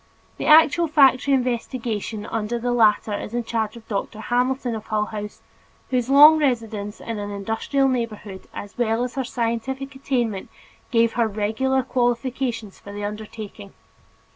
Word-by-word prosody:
The - - -3
actual 320 +2 +6
factory 275 -2 +4
investigation 235 -4 -2
under 225 +1 -2
the 245 +1 -2
latter 220 -2 +3
is 210 +2 -5
in 240 - 0
charge 220 -1 -2
of 225 - -15
Dr. 210 +1 -4
Hamilton, 250 +2 0
of 220 -1 -6
Hull 210 -1 0
House, 210 -1 -7 0.5
whose 250 -1 0
long 300 +3 +8
residence 225 -7 -1
in 225 -2 -5
an 205 0 -4
industrial 225 +7 0
neighborhood 220 -6 -4
as 205 +3 -9
well 230 0 +1
as 250 -1 -4
her 270 - -2
scientific 255 +4 -3
attainment, 240 -7 -2 0.4
give 230 -2 +3
her 230 -2 +1
peculiar 225 +6 0
qualifications 245 -3 -1
for 200 - -11
the 205 0 -6
undertaking. 210 -1 -8
230 Hz, 150 wpm, -23 LUFS, 215-260 Hz, 0.5 s, long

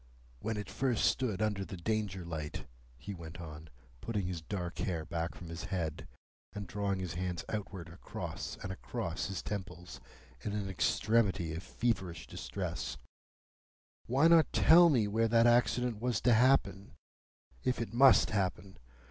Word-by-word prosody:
"When 110 - -3
it 105 - -4
first 130 -4 0
stood 110 -6 +1
under 105 -2 0
the 95 - -7
Danger 95 -1 -2
light," 80 -3 -5 0.3
he 70 +11 -7
went 85 -1 -9
on, 80 -1 -9 0.3
putting 105 -5 -2
his 90 -2 -3
dark 90 0 -5
hair 85 -7 -2
back 85 +1 -3
from 85 - -9
his 85 +1 -6
head, 80 -5 -3 0.5
and 105 -1 -5
drawing 100 +1 -1
his 90 -3 -4
hands 90 0 -3
outward 95 -5 -4
across 85 +2 -6
and 95 - -4
across 95 -2 -4
his 95 -2 -4
temples 90 -8 -6 0.4
in 100 - -3
an 105 -2 -2
extremity 95 -3 +1
of 80 - -4
feverish 95 -3 -2
distress, - - -4 1.1
"why 140 +6 +4
not 165 -1 +6
tell 170 +1 +7
me 120 -8 +3
where 115 +2 +2
that 115 +1 +4
accident 120 -1 +3
was 120 -3 +1
to 125 - +4
happen,—if 115 +1 0
it 115 -2 -4
must 130 +1 +6
happen? 95 -2 -2
100 Hz, 150 wpm, -33 LUFS, 85-115 Hz, 1.1 s, tell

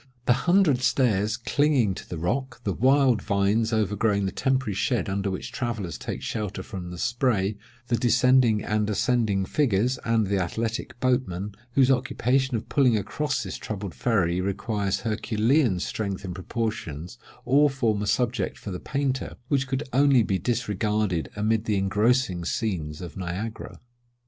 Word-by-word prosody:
The 125 - +5
hundred 170 0 +3
stairs 110 -5 +2
clinging 140 -9 +2
to - - -10
the 85 - -4
rock, 125 +11 -2
the 100 - -1
wild 130 -2 +3
vines 105 +3 +1
overgrowing 105 -1 +1
the 95 - -1
temporary 130 -5 0
shed 105 +6 0
under 100 0 -1
which 95 - -5
travellers 110 - -3
take - - -5
shelter 105 -3 -3
from 90 -4 -7
the 90 - -7
spray, 115 -3 0 0.3
the 120 -1 0
descending 120 -2 +4
and 105 0 0
ascending 110 -3 +1
figures, 125 0 +1
and 115 -2 +2
the 100 0 0
athletic 115 +5 -3
boatmen, 105 -7 0 0.2
whose 135 0 +4
occupation 130 0 +1
of 110 - -7
pulling 125 -6 +3
across 145 +7 -2
this - - -5
troubled 100 -4 -5
ferry 90 -7 +1
requires 100 +1 -1
herculean 110 - +1
strength 100 +1 -3
and 90 - -4
proportions, 95 - -4 0.3
all 145 +4 +5
form 115 -7 0
a 105 - -2
subject 115 -1 0
for 100 - -7
the 90 - -4
painter, 135 -2 -2
which 140 -2 +1
could 135 +2 -2
only 135 -2 +5
be 95 -2 0
disregarded 105 -3 -1
amid 110 +1 0
the 105 -3 +1
engrossing 100 -1 +1
scenes 85 -6 -2
of 85 -3 -8
Niagara. 95 +5 -5
110 Hz, 155 wpm, -25 LUFS, 100-125 Hz, 0.3 s, The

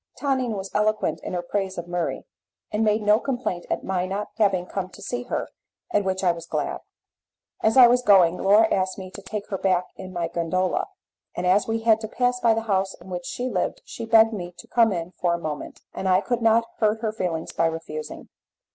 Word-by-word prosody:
Tonine 260 -5 0
was 190 0 -6
eloquent 215 +1 +1
in - - -6
her 175 -1 -2
praise 190 +1 -2
of 175 0 -5
Murray, 175 -1 -2 0.5
and 215 +1 +1
made 215 0 +2
no 210 +1 +5
complaint 245 -10 -3
at - - -1
my 185 -1 -1
not 200 +2 -3
having 195 -4 +2
come 185 0 -4
to - - -14
see 245 0 -4
her, - - -2 0.4
at 205 - +2
which 190 0 -2
I 180 - +4
was 170 0 -7
glad. - - -2 0.8
As 220 +3 +2
I 255 - +11
was 245 +1 +4
going 190 -7 +5
Laura 210 +3 +5
asked 185 0 0
me 185 -1 -8
to 200 - -9
take 205 +1 -5
her 195 - -3
back 185 -2 +2
in 185 -1 -8
my 175 -2 -2
gondola, 175 +2 -1 0.5
and 175 - -2
as 190 +3 +3
we 225 0 -1
had 225 -1 +4
to 220 - -5
pass 250 +2 0
by 230 -2 +4
the 225 - -2
house 195 -3 0
in 180 +2 -13
which 175 -1 -4
she 250 - -3
lived 255 - -2
she 230 - -7
begged 225 0 +6
me 175 -3 -6
to - - -12
come 230 -2 +3
in 170 -1 -3
for 175 -1 +2
a - - -3
moment, 155 -3 -6
and 190 - -2
I 185 +1 +4
could 240 +1 -2
not 230 0 +4
hurt 220 0 +2
her 220 -2 -1
feelings 175 -6 -3
by 165 - +1
refusing. 160 -1 -6
195 Hz, 225 wpm, -24 LUFS, 180-225 Hz, 0.8 s, I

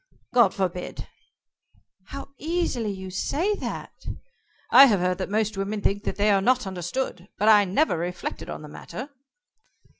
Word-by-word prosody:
"God 235 -6 +6
forbid!" 180 -2 -3 1.0
"How 275 +4 -8
easily 310 -8 -1
you 190 -1 -6
say 320 - 0
that!" - - -5 0.8
"I 275 - +10
have 205 -6 +3
heard 180 +1 0
that 185 - -3
most 215 0 0
women 200 +2 -2
think 200 +1 0
they 205 +1 +1
are 195 -1 +4
not 250 +3 +2
understood, 185 +1 -4
but 210 - +1
I 210 -2 +7
never 195 - +1
reflected 180 +1 -4
on - - -6
the - - -8
matter." 250 - -8
205 Hz, 150 wpm, -25 LUFS, 185-250 Hz, 1.0 s, I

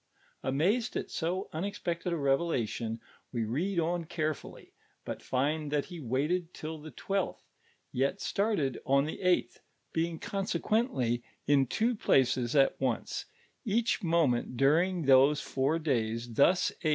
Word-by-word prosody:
Anuized 185 - +1
at - - -4
80 180 +3 -1
unexpected 175 0 -3
n - - +1
revelation, 135 -6 0 0.3
we 120 -3 -1 0.3
n - - +2
I - - +2
on 170 +1 -1
carefully, 155 -2 -4 0.3
but - - -5
find 145 +3 -1
tliat 150 +4 -1
ho 160 - -7
waited 160 +8 0
till 155 0 -6
the 155 +1 -9
twelfth, 195 +7 -2 0.5
yet 135 +10 0
started 195 - 0
on 140 +1 +3
the 155 - -5
eiufhtli, 180 -1 +1 0.3
being 165 0 0
consequently 195 - 0 0.2
in 140 -2 +4
two 230 - +1
places 130 - +2
at 135 -1 +3
once, 125 -4 -1 0.4
each 225 +2 +1
moment 155 -8 +1
during 165 +6 +3
those 135 +2 +6
fnur 145 +5 -1
days; 115 -4 -1
thus 175 +9 +4
n. 155 - +1
155 Hz, 140 wpm, -30 LUFS, 135-175 Hz, 0.5 s, those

